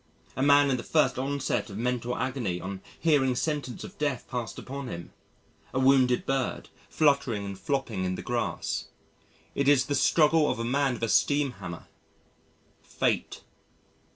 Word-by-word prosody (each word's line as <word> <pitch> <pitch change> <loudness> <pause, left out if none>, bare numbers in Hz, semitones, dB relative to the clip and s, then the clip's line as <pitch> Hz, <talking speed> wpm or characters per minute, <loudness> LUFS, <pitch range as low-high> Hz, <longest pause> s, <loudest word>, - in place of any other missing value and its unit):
A - - -2
man 145 0 +5
in 130 - +1
the 120 - -6
first 155 -4 +2
onset 140 -2 -1
of 100 - -7
mental 125 +1 -1
agony 120 -8 -2
on 95 +1 -6 0.2
hearing 140 -6 +3
sentence 145 -2 -2
of - - -11
death 145 -4 -1
passed 120 -3 -4
upon 140 0 -6
him. 85 -6 -7 0.6
A - - +2
wounded 130 -2 +4
bird, 135 -2 -2 0.2
fluttering 140 -9 +2
and 100 -1 -5
flopping 115 -3 -2
in 90 0 -1
the - - -7
grass. - - -2 0.7
It 140 - 0
is 145 -2 +5
the 145 - -2
struggle 150 +3 +4
of - - -1
a 115 - -3
man 135 +2 +1
with 115 - -8
a - - +2
steam 145 +3 +3
hammer 90 -6 -8 1.0
Fate. - - -2
130 Hz, 160 wpm, -28 LUFS, 115-140 Hz, 1.0 s, man